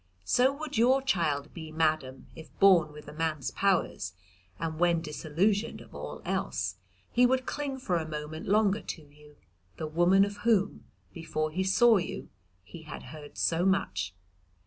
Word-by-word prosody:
So 250 - +4
would 290 -3 -4
your 260 +3 +4
child 155 - 0
be, 160 -2 -8
madam, 155 -4 0
if 160 - -11
born 180 -6 +5
with 150 0 -12
a - - -9
man's 155 -3 -2
powers, 180 - 0 0.5
and 160 -1 -3
when 170 -1 +3
disillusioned 170 +7 -1
of - - -15
all - - -7
else, - - -2 0.3
he 245 +1 +5
would 260 0 +1
cling 285 -2 -3
for 200 -10 -1
a 160 -1 -3
moment 155 +1 -6
longer 205 0 +3
to 165 - -6
you, 150 0 -19 0.4
the 160 - -3
woman 175 +5 +4
of 205 0 -6
whom, 215 -3 +1 0.3
before 155 -2 -3
he 185 +4 -1
saw 220 +4 +5
you, 180 - -4 0.3
he 160 - -11
had 155 -2 -9
heard 150 -2 -11
so 170 +1 +1
much. 95 - 0
170 Hz, 165 wpm, -29 LUFS, 155-205 Hz, 0.5 s, born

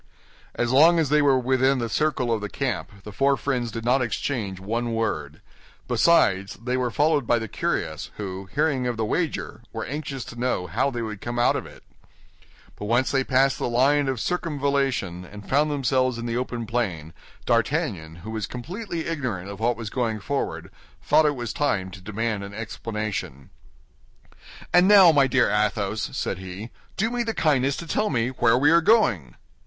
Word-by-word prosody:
As 120 0 0
long 160 +6 +6
as 160 -4 +1
they 150 +1 +4
were 140 -2 +4
within 130 +1 +2
the 120 -2 -2
circle 130 -1 0
of 110 - -1
the 105 - -4
camp, 100 - -4
the 105 - -8
four 135 +6 +2
friends 125 -4 -1
did 115 +1 -6
not 130 +2 +3
exchange 110 -5 -2
one 115 +4 -2
word; 75 -10 -3 0.5
besides, 100 - +3
they 125 +3 -3
were 125 -1 0
followed 145 0 +1
by 120 - +3
the 110 -1 -4
curious, - - -3
who, 95 -2 -6
hearing 145 -4 +1
of 120 -2 -2
the 110 - 0
wager, 155 -3 -2
were 115 - -4
anxious 140 -3 -5
to 120 - -10
know 125 -7 0
how 90 - 0
they 120 -3 -4
would 105 -3 -6
come 120 0 -4
out 120 - +3
of - - -4
it. - - -15 0.9
But - - -7
when - - -5
once 130 - -3
they 135 -1 +2
passed 135 +1 +2
the - - -1
line 135 +4 +3
of 130 -3 -1
circumvallation 140 - -1
and 100 +2 -11
found 145 +3 +2
themselves 130 -3 +1
in 115 - -5
the 115 -1 -2
open 120 -1 -3
plain, 95 -9 -3 0.3
D'Artagnan, 80 -2 -1
who 110 - -5
was 110 -2 -3
completely 170 - -5
ignorant 120 - -3
of 100 - -9
what 120 +2 +1
was 115 -3 -6
going 115 -4 -1
forward, 140 +7 -3 0.3
thought 155 - +4
it 145 - +1
was 120 -3 -4
time 105 - -1
to 95 - -11
demand 105 +1 -2
an 100 0 -8
explanation. 105 - -5 1.2
"And 180 +1 +6
now, 195 -4 +8
my 140 -3 +4
dear 130 - +2
Athos," 105 0 -1
said 95 - -2
he, 95 +5 -8 0.3
"do 220 +4 0
me 245 0 -1
the 230 -1 -2
kindness 140 -3 +2
to 170 - -6
tell 210 +6 0
me 120 -3 0
where 125 -2 +2
we 145 +4 +4
are 170 0 +6
going?" 125 - +2
120 Hz, 190 wpm, -24 LUFS, 105-140 Hz, 1.2 s, now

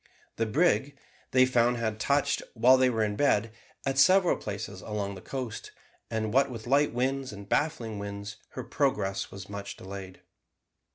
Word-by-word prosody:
The 115 - 0
brig, 145 +1 +2 0.3
they 130 0 +5
found, 120 -1 +2
had 110 -2 -2
touched, 140 +4 +1
while 125 +3 +6
they 130 0 +4
were 115 -3 +1
in 105 -1 -1
bed, 115 -3 +2 0.3
at 135 0 0
several 185 +4 +6
places 100 -2 -6
along 105 -2 -3
the 95 - -9
coast: 125 -3 -5 0.4
and 110 -1 -2
what 135 +1 +4
with 115 -3 -7
light 140 +4 +3
winds 130 +2 -1
and 100 -1 -10
baffling 115 -7 -1
winds 100 +1 -6 0.2
her 130 - -5
progress 105 -9 -1
was 95 0 -9
much 100 0 -7
delayed. 95 -1 -9
115 Hz, 165 wpm, -28 LUFS, 100-135 Hz, 0.4 s, while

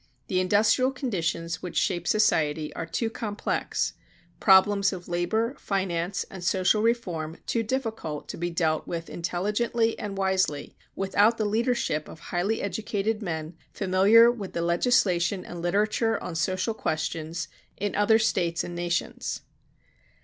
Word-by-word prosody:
The 185 - +2
industrial 210 +7 +3
conditions 170 - -2
which 180 - -5
shape 175 -3 0
society 155 -8 +2
are - - -5
too 230 +7 -1
complex, 220 -2 -2 0.5
problems 195 0 +5
of 180 -3 -7
labor, 220 +8 0
finance, 190 -2 -1
social 185 +4 +2
reform 180 -9 -1
too 230 - 0
difficult 225 - -3
to - - -5
be 175 +1 -2
dealt 160 -2 0
with 165 -1 -5
intelligently 210 +6 0
and 200 -2 -5
wisely 190 -6 0 0.2
without 205 +4 +3
the 215 - 0
leadership 220 - 0
of - - -11
highly 190 +5 -1
educated 210 +2 -2
men 160 -4 -4 0.2
familiar 205 +5 +5
with 210 -6 -7
the 170 - -1
legislation 180 0 +2
and 175 -1 -7
literature 210 +5 +1
on 180 - -6
social 185 +6 0
questions 160 -2 -3 0.3
in 205 +1 -2
other 205 +2 +5
States 170 -7 +1
and 175 - -6
nations. 175 - -2
190 Hz, 135 wpm, -26 LUFS, 170-220 Hz, 0.5 s, problems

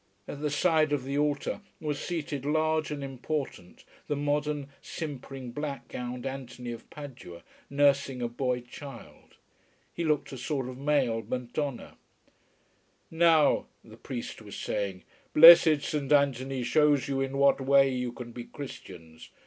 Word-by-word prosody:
At 145 - -7
the 150 - 0
side 155 0 +2
of 140 -3 0
the 135 +2 -4
altar 145 +5 0 0.2
was 150 -2 -3
seated 150 -6 -4
large 155 +1 +1
and 145 -2 -4
important 135 - -5 0.2
the 145 - 0
modern, 145 0 -1
simpering, 135 -4 -7
black 145 +2 -5
gowned 125 0 -5
Anthony 130 -2 -6
of 115 - -9
Padua, 125 - -10 0.3
nursing 140 -2 +2
a 120 - -1
boy 125 +1 -2
child. 135 +3 -12 0.6
He 170 - -3
looked 150 -3 0
a 135 - -7
sort 135 -1 -2
of 130 0 -8
male 135 -6 +1
Madonna. 125 +2 -4 1.1
"Now," 160 -2 +4 0.2
the - - -14
priest - - -7
was - - -10
saying, 95 -3 -3 0.3
"blessed 160 -2 +9
Saint 150 -2 -3
Anthony 135 -2 +2
shows 150 +1 +3
you 135 -1 -1
in 135 0 -2
what 140 0 +4
way 135 +1 +5
you 125 -1 -2
can 120 -1 -9
be 120 0 -8
Christians. 85 - -10
140 Hz, 145 wpm, -28 LUFS, 125-150 Hz, 1.1 s, blessed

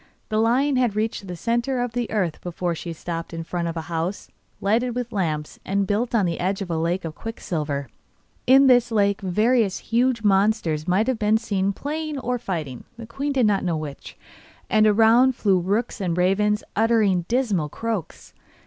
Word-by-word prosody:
The 215 0 0
lion 255 +5 +2
had 245 -5 +1
reached 215 -2 -2
the 180 - -5
centre 240 +6 -1
of 245 -1 -1
the 240 -1 -2
earth 185 -8 -1
before 175 0 -3
she 170 +1 -6
stopped 165 +1 -5
in 165 - -4
front 170 0 -3
of 165 0 -4
a - - -2
house, 165 +4 -4 0.3
lighted 230 +4 +1
with 245 -1 -3
lamps, 155 -7 -2
and 200 +1 0
built 225 +5 -1
on 210 -4 +3
the 170 -1 -2
edge 190 +2 -1
of 180 - -7
a 165 - 0
lake 170 +2 -1
of 160 - -5
quicksilver. 150 - -4 0.6
In 270 +2 +7
this 245 -2 +4
lake 200 -2 +2
various 210 +2 +2
huge 235 0 0
monsters 195 -6 +2
might 220 +7 +1
be 215 +1 +3
seen 200 -4 -1
playing 305 +7 -4
or 250 -1 -2
fighting 160 - -5
the 230 - -8
queen 275 +6 -3
did 260 -4 +2
not 205 -2 +2
know 170 -3 0
which 150 -3 -8 0.5
and 215 0 +5
around 230 +4 +5
flew 195 -5 +2
rooks 205 +5 -1
and 175 -3 -1
ravens, 210 +3 +2
uttering 215 -5 +2
dismal 220 - 0
croaks. 225 -1 -5
210 Hz, 185 wpm, -23 LUFS, 175-235 Hz, 0.6 s, In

